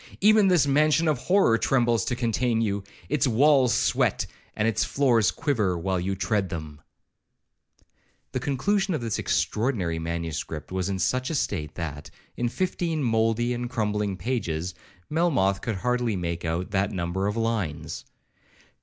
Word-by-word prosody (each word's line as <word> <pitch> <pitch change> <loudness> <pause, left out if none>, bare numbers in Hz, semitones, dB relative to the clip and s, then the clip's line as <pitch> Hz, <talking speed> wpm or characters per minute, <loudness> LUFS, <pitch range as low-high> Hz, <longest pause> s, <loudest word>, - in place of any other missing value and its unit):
Even 210 0 +5
this 180 -6 +4
mansion 150 +3 +3
of 150 -5 +1
horror 130 - +3
trembles 120 -5 +2
to 125 - -1
contain 120 0 0
you; 100 -3 -1 0.2
its 145 -1 +1
walls 130 +1 +4
sweat, - - +1 0.3
and 105 0 +1
its 110 -1 +1
floors 120 -7 +3
quiver, 110 - 0
while 95 +2 -1
you 95 +2 -2
tread 100 0 0
them.' 75 -4 -7 1.5
The 130 - -2
conclusion 190 +9 0
of 150 - -3
this 115 -3 -2
extraordinary 105 -8 0
manuscript 80 -2 -4
was 95 0 -1
in 95 - -1
such 130 +8 0
a 160 - -2
state, 80 - -2
that, 75 -3 -5 0.3
in 120 0 -1
fifteen 170 -1 -1
mouldy 115 +1 +1
and 120 0 -4
crumbling 105 -4 -1
pages, 90 -5 -2 0.3
Melmoth 145 - +1
could 115 - -2
hardly 125 +2 0
make 85 -2 -3
out 85 +4 -2
that 100 +1 +1
number 95 +1 -2
of 105 +2 -2
lines. 100 -10 -2
110 Hz, 150 wpm, -26 LUFS, 95-130 Hz, 1.5 s, Even